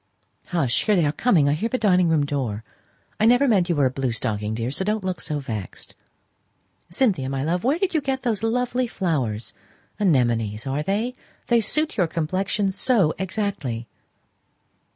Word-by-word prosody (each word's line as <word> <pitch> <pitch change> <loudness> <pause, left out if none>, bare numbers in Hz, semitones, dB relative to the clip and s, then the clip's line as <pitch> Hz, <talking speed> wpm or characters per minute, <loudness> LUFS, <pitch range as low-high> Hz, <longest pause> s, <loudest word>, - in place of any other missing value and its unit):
"Hush; 150 -9 0
here 210 - +3
they 170 -4 +3
are 145 - +2
coming: 165 - +3
I 145 - +3
hear 215 +10 -1
the 255 - 0
dining 185 -6 +3
room 155 -3 +2
door! 125 -7 -3 0.6
I 215 - +4
never 245 +4 +5
meant 195 -7 +3
you 170 - +2
were 145 -2 +3
a 130 - +2
blue 130 -1 -1
stocking, 105 -1 -2
dear, 115 +2 -2
so 165 - -2
don't 210 +1 -1
look 185 -3 -2
vexed. 120 -10 -5 1.0
Cynthia, 175 - +1
my 135 0 -2
love, 175 +4 -1
where 275 +6 +2
did 380 +1 -1
you 315 - +2
get 265 -2 -2
those 225 -5 0
lovely 245 +2 0
flowers 135 - -2 0.5
anemones, 120 - +1
are 135 +2 -1
they? 210 +9 -1 0.4
They 235 -1 +4
suit 305 +6 0
your 180 -4 +3
complexion 185 +5 -1
so 195 -4 +3
exactly." 190 - -3
175 Hz, 175 wpm, -23 LUFS, 135-220 Hz, 1.0 s, never